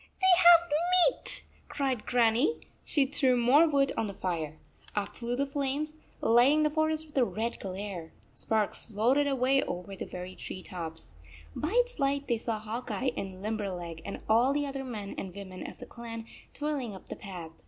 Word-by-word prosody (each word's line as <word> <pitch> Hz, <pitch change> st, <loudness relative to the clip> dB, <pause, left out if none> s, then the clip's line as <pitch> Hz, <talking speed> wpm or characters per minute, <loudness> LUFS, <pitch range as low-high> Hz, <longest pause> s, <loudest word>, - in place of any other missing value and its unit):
They 375 Hz, -1 st, +6 dB
have 345 Hz, -1 st, +7 dB, 0.4 s
meat," -, -, -3 dB, 0.3 s
cried 265 Hz, -5 st, -2 dB
Grannie. 245 Hz, -, +3 dB, 0.2 s
She 285 Hz, -3 st, +2 dB
threw 265 Hz, -2 st, +2 dB
more 265 Hz, +7 st, +6 dB
wood 275 Hz, -2 st, +2 dB
on 225 Hz, -, -1 dB
the 200 Hz, -, -6 dB
fire. 160 Hz, -5 st, -3 dB, 0.4 s
Up 205 Hz, 0 st, -2 dB
flew 240 Hz, 0 st, -3 dB
the 280 Hz, +2 st, 0 dB
flames, 285 Hz, +2 st, -2 dB, 0.2 s
lighting 250 Hz, +7 st, +5 dB
the 300 Hz, -, +2 dB
forest 315 Hz, 0 st, 0 dB
with 305 Hz, -, -20 dB
a -, -, +5 dB
red 230 Hz, 0 st, -2 dB
glare. 190 Hz, -3 st, -6 dB, 0.2 s
Sparks 220 Hz, -2 st, -1 dB
floated 240 Hz, +7 st, +2 dB
away 270 Hz, 0 st, +3 dB
over 180 Hz, +3 st, -5 dB
the -, -, -6 dB
very 180 Hz, +1 st, -7 dB
tree 185 Hz, -, -7 dB
tops. 165 Hz, -, -7 dB, 0.4 s
By 315 Hz, +7 st, -2 dB
its -, -, +2 dB
light 280 Hz, 0 st, 0 dB
they 235 Hz, -3 st, +1 dB
saw 225 Hz, -1 st, -2 dB
Hawk 225 Hz, +4 st, -6 dB
Eye 245 Hz, +5 st, 0 dB
and 190 Hz, -1 st, -6 dB
Limberleg 185 Hz, -6 st, -4 dB
and 200 Hz, -, -7 dB
all 235 Hz, +5 st, +4 dB
the 290 Hz, 0 st, 0 dB
other 275 Hz, -1 st, -4 dB
men 215 Hz, -6 st, -6 dB
and 190 Hz, -1 st, -7 dB
women 190 Hz, -2 st, -7 dB
of -, -, -13 dB
the -, -, -9 dB
clan 230 Hz, -1 st, -8 dB, 0.3 s
toiling 280 Hz, -7 st, -2 dB
up 190 Hz, -, -13 dB
the -, -, -5 dB
path. 180 Hz, -5 st, -8 dB
235 Hz, 185 wpm, -30 LUFS, 200-280 Hz, 0.4 s, have